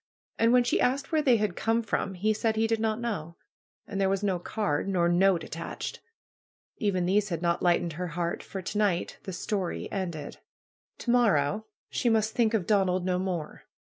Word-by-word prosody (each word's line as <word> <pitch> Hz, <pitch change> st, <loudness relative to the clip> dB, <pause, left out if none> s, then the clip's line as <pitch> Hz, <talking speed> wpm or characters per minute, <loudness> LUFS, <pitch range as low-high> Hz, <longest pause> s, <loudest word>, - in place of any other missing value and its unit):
And 230 Hz, +1 st, +4 dB
when 250 Hz, 0 st, +5 dB
she 240 Hz, -, +1 dB
asked 270 Hz, +4 st, +1 dB
where 315 Hz, -1 st, +3 dB
they 255 Hz, -5 st, +4 dB
had 210 Hz, -4 st, -1 dB
come 230 Hz, +1 st, +1 dB
from 200 Hz, -3 st, -2 dB
he 215 Hz, +4 st, +1 dB
said 220 Hz, +1 st, 0 dB
he 220 Hz, +1 st, +2 dB
did 225 Hz, 0 st, +1 dB
not 220 Hz, 0 st, 0 dB
know. 185 Hz, -9 st, -4 dB, 0.5 s
And 195 Hz, -1 st, -3 dB
there 190 Hz, -, +3 dB
was 195 Hz, +1 st, 0 dB
no 190 Hz, -3 st, +1 dB
card, 195 Hz, -4 st, -1 dB
nor 175 Hz, -3 st, +2 dB
note 180 Hz, +1 st, +3 dB
at -, -, -10 dB
tached. -, -, -5 dB, 0.8 s
Even 190 Hz, -5 st, 0 dB
these 200 Hz, +3 st, +2 dB
had 170 Hz, -1 st, -3 dB
not 170 Hz, 0 st, +1 dB
lightened 175 Hz, -1 st, +2 dB
her 180 Hz, +3 st, -4 dB
heart. 170 Hz, -1 st, -1 dB
For 190 Hz, -1 st, -7 dB
to 205 Hz, -, -4 dB
night 195 Hz, -5 st, 0 dB
'Hhe 190 Hz, -, -5 dB
story" 185 Hz, +1 st, -3 dB
ended! 170 Hz, -7 st, -4 dB, 0.6 s
To 240 Hz, -, -1 dB
morrow 215 Hz, -5 st, +2 dB, 0.2 s
she 240 Hz, -, +1 dB
must 220 Hz, -1 st, +2 dB
think 230 Hz, -2 st, +2 dB
of 195 Hz, -5 st, 0 dB
Donald 185 Hz, -3 st, +2 dB
no 180 Hz, -1 st, +1 dB
more. 180 Hz, -5 st, -4 dB
195 Hz, 200 wpm, -28 LUFS, 175-220 Hz, 0.8 s, when